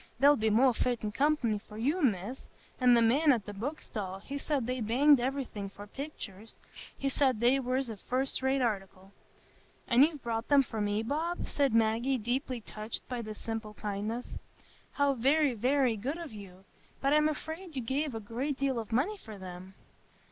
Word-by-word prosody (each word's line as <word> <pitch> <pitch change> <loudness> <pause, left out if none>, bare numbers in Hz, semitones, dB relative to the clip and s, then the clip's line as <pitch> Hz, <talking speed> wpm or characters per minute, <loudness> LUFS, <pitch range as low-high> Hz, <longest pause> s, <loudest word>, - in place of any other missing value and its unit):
They'll 285 +1 +7
be 220 -4 +1
more 245 +4 +5
fittin' 230 -3 -1
company 255 -4 +1
for 210 0 -13
you, 290 +11 0
Miss; 225 - -1 0.3
and 250 -2 +6
the 230 - +4
man 285 +7 +4
at 230 -6 +1
the 205 - -6
book 265 +10 -4
stall, 190 -4 -5
he 265 +8 -7
said 280 -4 -1
they 255 +1 -2
banged 265 +6 +5
iverything 245 -6 -3
for 205 +1 -10
picturs; 220 -4 -8 0.4
he 275 - -2
said 265 -4 +2
they 245 +4 +4
was 260 +1 -1
a 220 -2 -6
fust 260 +7 -1
rate 265 0 +2
article." 195 -4 -3 0.8
"And 240 +1 +5
you've 300 -3 0
bought 230 0 -2
them 285 -1 +6
for 225 -4 -4
me, 205 +1 0
Bob?" 320 +8 -2
said 280 -2 +1
Maggie, 230 +4 +2
deeply 245 +2 -2
touched 215 +1 -5
by 250 -2 -3
this 215 -2 -7
simple 225 -2 -5
kindness. 210 +4 -3 0.7
"How 285 -1 +2
very, 275 +3 +3
very 250 +1 +2
good 270 +10 -3
of 335 -5 -7
you! 195 -2 -11 0.3
But 275 +1 +2
I'm 300 0 +4
afraid 320 +2 -6
you 260 - -2
gave 270 +2 -1
a - - -2
great 245 +7 -3
deal 270 -3 0
of 225 0 -7
money 305 - +1
for 220 - -10
them." 185 0 -9
245 Hz, 185 wpm, -31 LUFS, 215-275 Hz, 0.8 s, They'll